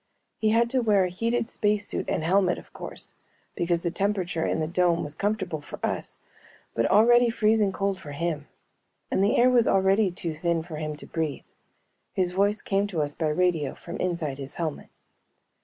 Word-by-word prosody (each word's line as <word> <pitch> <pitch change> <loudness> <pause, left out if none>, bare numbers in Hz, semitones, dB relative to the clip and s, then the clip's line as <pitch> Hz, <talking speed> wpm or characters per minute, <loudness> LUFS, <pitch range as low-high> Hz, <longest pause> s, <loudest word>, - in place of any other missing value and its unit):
He 215 - +2
had 230 +2 +4
to 260 - +2
wear 210 -4 +4
a 180 - 0
heated 230 +5 -1
space 210 -2 0
suit - - -2
and - - 0
helmet, 180 +1 +3
of - - -13
course, - - -6 0.4
because 170 0 0
the 170 - 0
temperature 185 -3 -1
in - - 0
the 155 - 0
dome 175 0 +2
was 145 - -4
comfortable 190 -4 -2
for - - -9
us - - -4 0.5
but 115 0 +1
already 240 +3 +5
freezing 215 -3 +2
cold 195 0 -1
for 145 -6 -9
him 150 -1 -2 0.6
and 190 - +2
the 205 - +3
air 250 +1 +5
was 240 -2 +4
already 195 +2 +3
too 170 -2 -4
thin 165 +1 -1
for 160 -2 -7
him 155 0 -3
to 150 - -7
breathe. 160 -4 -3 0.7
His 180 -2 +1
voice 200 +3 +1
came 200 +1 +1
to 170 -7 -1
us 145 0 -2
by 160 - -1
radio 165 -2 +1
from 170 - -8
inside 165 -6 -2
his 135 0 -7
helmet. 160 -3 -4
180 Hz, 190 wpm, -26 LUFS, 160-205 Hz, 0.7 s, already